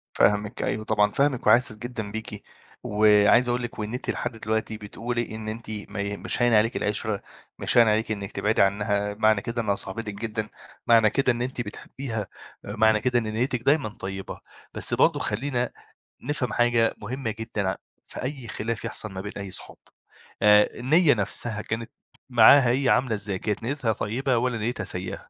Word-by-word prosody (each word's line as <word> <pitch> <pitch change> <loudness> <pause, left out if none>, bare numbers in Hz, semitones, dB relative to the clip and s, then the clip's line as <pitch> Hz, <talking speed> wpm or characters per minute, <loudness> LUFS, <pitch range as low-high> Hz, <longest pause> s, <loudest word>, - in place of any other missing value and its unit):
فاهمِك 105 +1 +2
أيوه 110 - -2
طبعًا 105 -1 +2
فاهمِك 140 -3 0
وحاسس 120 -2 +5
جدًا 110 -3 -6
بيكِ، 110 -2 -7 0.4
وعايز 105 +3 +4
أقول 120 0 0
لِك 120 -2 -6
وإن 105 +2 -4
أنتِ 125 - -4
لحد 120 - -2
دلوقتي 110 0 -2
بتقولي 115 +2 -4
إن 110 -1 -7
أنتِ 115 +2 -6 0.3
ما 105 - -5
ي 100 0 -3
مش - - -2
هاين 120 -1 +4
عليكِ 110 +2 +3
العِشرة 105 -1 -1 0.4
مش - - 0
هاين 115 -2 +7
عليكِ 110 +1 +1
إنِك 100 -1 -4
تبعدي 105 0 +1
عنها 100 +1 +1
معنى 110 -1 +3
كده 115 +1 -2
إنها 100 -2 0
صاحبتِك 105 +2 -5
جدًا، 110 0 -3 0.4
معنى 115 -2 +6
كده 135 0 +2
إن 120 0 -3
أنتِ 125 0 -3
بتحبيها، 110 0 -6 0.4
معنى 110 -1 +2
كده 120 +1 +2
إن 115 - -4
نيتِك 120 +1 -1
دايمًا 140 -3 +2
طيبة، 95 -2 -7 0.3
بس - - +1
برضو - - +3
خلّينا 125 -2 -2 0.5
نفهم 130 -3 -2
حاجة 120 -1 +2
مهمة 120 +2 -3
جدًا 105 -4 -2 0.3
في - - -8
أي 130 -3 -5
خلاف 115 +1 -3
يحصل 110 -3 -3
ما 95 - -6
بين 100 +1 -6
أي 100 -1 -6
صحاب، - - -5 0.7
آآ 105 0 +6
النية 150 +5 +4
نفسها 105 +1 -2
كانت 115 +1 -5 0.4
معاها 120 +2 +7
هي 130 +2 +2
عاملة 125 -2 +2
إزاي؟ 100 -2 -3
كانت 105 +3 -3
نيتها 125 -3 -1
طيبة 125 +5 -1
والّا 125 0 0
نيتها 115 0 -2
سيئة؟ 95 +1 -4
110 Hz, 175 wpm, -25 LUFS, 105-120 Hz, 0.7 s, هاين